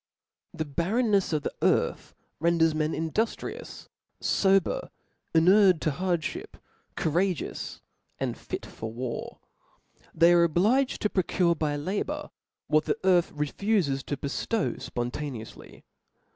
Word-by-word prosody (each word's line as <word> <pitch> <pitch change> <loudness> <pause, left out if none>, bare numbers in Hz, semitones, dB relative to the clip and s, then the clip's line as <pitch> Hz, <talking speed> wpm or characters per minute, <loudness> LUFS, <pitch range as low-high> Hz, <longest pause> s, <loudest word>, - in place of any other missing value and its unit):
^1r^ - - -4
H 155 - -1
E - - -14
barreftriefs 200 - +1
of 150 -2 0
xkt - - -1
earth - - +1 0.2
renders 165 0 +3
men 155 0 0
in 160 0 -2
•*' - - -23
duftrious, 225 +1 -3 0.3
fober, 195 - +2 0.5
inured 185 +1 +6
to 155 - +1
hardfhip, 185 - -2 0.4
cou 160 - -1
rageousj 180 0 -1 0.4
and - - -2
fit - - -6
for 110 0 -7
War; 120 +1 -5 0.8
they 170 +2 +6
are 170 -1 +6
obliged 210 - +2
to 210 - +2
pro 190 - +2
tuvt 170 -2 +1
by 150 -2 0
labour 185 +8 -3 0.3
what 155 0 +2
the - - 0
earth 180 -2 +4
refufes 150 -1 0
to 145 - -2
beftoW 175 +10 -2
Ipontaneoufly. 120 -1 -6
170 Hz, 135 wpm, -27 LUFS, 150-195 Hz, 0.8 s, inured